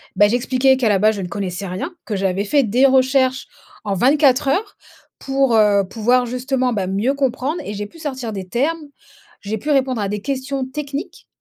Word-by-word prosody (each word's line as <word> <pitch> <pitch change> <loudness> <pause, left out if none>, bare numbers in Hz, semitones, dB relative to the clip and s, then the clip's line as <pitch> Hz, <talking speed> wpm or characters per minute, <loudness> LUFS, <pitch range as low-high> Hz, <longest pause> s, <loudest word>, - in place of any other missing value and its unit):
Bah 205 - +5
j'expliquais 255 +3 +2
qu'à 245 -4 +1
la 200 -2 +3
base 215 +1 +3
je - - -4
ne 180 - -4
connaissais 195 +1 -4
rien, 190 - -5
que 215 - -3
j'avais 190 +1 -1
fait 280 +6 +3
des 245 +4 +3
recherches 260 -1 +2 0.4
en 200 - -1
24 275 - +3
heures 410 +8 -1 0.4
pour, 270 -3 +1
heu, 205 -2 +4
pouvoir 245 +4 +1
justement 255 +1 -1
bah 195 -4 -2
mieux 205 +8 0
comprendre 275 +4 -1
et 205 - -5
j'ai 210 0 -4
pu 330 - -17
sortir 260 -7 -5
des 190 -2 -6
termes, 295 - -1 0.6
j'ai 210 +2 -3
pu 285 +9 -6
répondre 260 -4 +1
à 200 - -2
des 210 0 -3
questions 270 +2 -3
techniques 280 +2 -6
250 Hz, 195 wpm, -19 LUFS, 205-270 Hz, 0.6 s, Bah